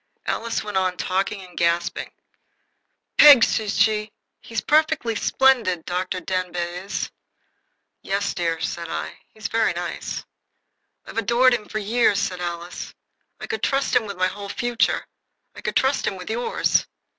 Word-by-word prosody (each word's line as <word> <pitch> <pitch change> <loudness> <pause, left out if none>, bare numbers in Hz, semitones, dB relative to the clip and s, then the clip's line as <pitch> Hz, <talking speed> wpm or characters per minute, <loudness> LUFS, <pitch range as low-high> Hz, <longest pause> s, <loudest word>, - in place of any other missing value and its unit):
Alice 230 0 -2
went 210 -2 -3
on 185 -1 0
talking 195 +1 -1
and 180 -1 -15
gasping. 170 0 0 1.1
"Peg," 285 -6 +10
she 215 -2 +1
said, 210 +1 +2 0.3
"he's 225 -1 -4
perfectly 305 -6 +2
splendid 225 -7 +2
Dr. 185 +1 -2
Denbigh 180 -1 -3
is." 200 - -3 0.9
"Yes, 200 +1 -1
dear," 165 -2 -1
said 170 -1 -3
I, - - -5
"he's 215 -2 -5
very 225 0 +1
nice." - - -5 0.8
"I've - - -3
adored 240 +3 +4
him 215 -3 -2
for 215 - -3
years," 215 0 +2
said 190 -3 -2
Alice. 175 0 -5 0.4
"I - - -6
could 445 0 -4
trust 275 0 +1
him 220 - +3
with 200 -2 -6
my 185 - +2
whole 200 +2 -4
future. 240 +1 0 0.5
I - - -10
could - - -3
trust 265 +1 +2
him - - -1
with 185 +2 -6
yours." 240 +2 +1
200 Hz, 150 wpm, -23 LUFS, 180-230 Hz, 1.1 s, Peg